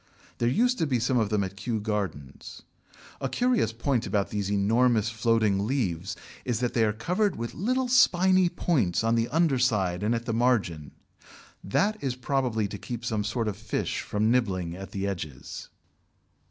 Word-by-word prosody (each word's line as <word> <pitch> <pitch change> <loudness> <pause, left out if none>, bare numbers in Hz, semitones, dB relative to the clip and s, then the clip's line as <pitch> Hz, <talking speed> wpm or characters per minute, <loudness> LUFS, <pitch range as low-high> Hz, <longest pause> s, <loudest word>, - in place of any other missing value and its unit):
There 120 - +2
used 245 - +2
to 160 - +1
be 130 -3 +1
some 125 +2 +1
of 110 -3 +1
them 105 -2 +1
at 95 0 -5
Kew 110 +3 -2
Gardens. 100 - -5 0.6
A 135 - -2
curious 240 - +1
point 120 +1 -1
about 100 -2 0
these 100 -1 -2
enormous 110 +2 +2
floating 110 -3 +1
leaves 95 - -1 0.3
is 120 -3 -1
that 125 -1 -1
they 115 - +3
are 105 - +2
covered 180 - 0
with 115 0 -5
little 255 +8 0
spiny 185 -7 +4
points 135 - 0
on 115 0 +2
the 115 0 +1
under 155 -5 +2
side 100 -8 +1
and 110 +3 +1
at 115 0 -4
the 115 - -2
margin; 105 - +1 0.7
that 210 - 0
is 130 -3 -1
probably 125 -5 0
to 100 - -7
keep 120 +3 -6
some 110 -3 -1
sort 115 +2 -2
of 105 - -2
fish 110 0 -3
from 105 +2 0
nibbling 95 -9 0
at 95 0 -8
the 100 0 -3
edges. 85 -9 -6
115 Hz, 180 wpm, -27 LUFS, 100-130 Hz, 0.7 s, spiny